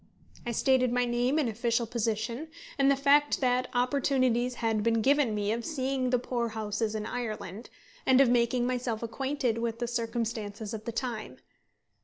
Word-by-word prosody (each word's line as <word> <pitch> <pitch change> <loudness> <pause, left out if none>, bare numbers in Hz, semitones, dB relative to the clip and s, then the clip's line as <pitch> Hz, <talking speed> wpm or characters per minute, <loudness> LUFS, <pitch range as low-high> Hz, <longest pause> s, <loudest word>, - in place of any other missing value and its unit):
I - - 0
stated 255 +1 +2
my 245 0 +2
name 245 +4 +1
and 300 -5 +2
official 230 +1 0
position, 230 +4 -2 0.3
and 275 0 +5
the 275 - +5
fact 285 +2 +3
that 250 -1 +1
opportunities 250 -1 +1
had 225 -3 0
been 225 0 +1
given 275 -4 +3
me 205 0 0
of 230 +1 -2
seeing 265 -3 -1
the 250 - +3
poor 240 -1 -2
houses 215 0 -2
in 215 -1 -3
Ireland, 220 -3 -5 0.3
and 260 0 +4
of 275 - +6
making 240 0 +2
myself 245 -3 -2
acquainted 260 -1 -1
with 230 -1 -2
the 240 0 -2
circumstances 225 -3 -3
of 220 -1 -6
the 235 - -3
time. 235 -2 -4
240 Hz, 170 wpm, -29 LUFS, 225-255 Hz, 0.3 s, of